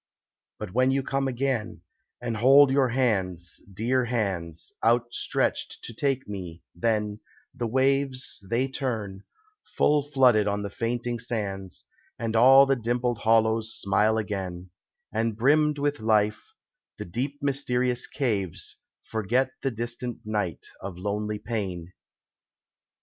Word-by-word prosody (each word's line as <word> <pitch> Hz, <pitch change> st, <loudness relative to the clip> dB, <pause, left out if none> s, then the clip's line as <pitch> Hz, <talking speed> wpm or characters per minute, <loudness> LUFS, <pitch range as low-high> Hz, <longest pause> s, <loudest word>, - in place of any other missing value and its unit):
But 105 Hz, -4 st, -7 dB
when 130 Hz, +2 st, +3 dB
you 135 Hz, 0 st, +1 dB
come 135 Hz, 0 st, -1 dB
again, 125 Hz, -9 st, -2 dB, 0.4 s
and 120 Hz, -2 st, -3 dB
hold 135 Hz, +4 st, +7 dB
your 135 Hz, -1 st, +3 dB
hands 95 Hz, -9 st, -1 dB
Dear 120 Hz, +6 st, 0 dB
hands, 95 Hz, -9 st, -3 dB
outstretched 120 Hz, +1 st, 0 dB
to 120 Hz, -, -7 dB
take 135 Hz, +2 st, -1 dB
me, 90 Hz, -5 st, -7 dB
then, 105 Hz, +2 st, -1 dB, 0.3 s
the 120 Hz, -, -3 dB
waves, 130 Hz, -1 st, +1 dB
They 125 Hz, +3 st, +1 dB
turn, 110 Hz, -8 st, -4 dB, 0.5 s
full 150 Hz, 0 st, +4 dB
flooded 130 Hz, -7 st, +3 dB
on 100 Hz, 0 st, -1 dB
the 100 Hz, -, -5 dB
fainting 120 Hz, +1 st, -2 dB
sands, 100 Hz, -6 st, -4 dB, 0.3 s
And 115 Hz, -1 st, -3 dB
all 135 Hz, +4 st, +8 dB
the 135 Hz, 0 st, +2 dB
dimpled 120 Hz, 0 st, -1 dB
hollows 110 Hz, 0 st, +2 dB
smile 105 Hz, +3 st, +2 dB
again, 95 Hz, -4 st, -4 dB, 0.4 s
And 110 Hz, -1 st, 0 dB
brimmed 150 Hz, +4 st, +3 dB
with 145 Hz, -1 st, -1 dB
life, 105 Hz, -1 st, +1 dB, 0.5 s
the -, -, -6 dB
deep 130 Hz, +11 st, -3 dB
mysterious 125 Hz, -3 st, 0 dB
caves 105 Hz, -, -2 dB, 0.3 s
Forget 115 Hz, +4 st, 0 dB
the 135 Hz, -, 0 dB
distant 120 Hz, +1 st, -5 dB
night 105 Hz, -5 st, -2 dB, 0.2 s
of 95 Hz, -2 st, -6 dB
lonely 105 Hz, +2 st, -2 dB
pain. 95 Hz, -6 st, -4 dB
115 Hz, 125 wpm, -26 LUFS, 105-130 Hz, 0.5 s, all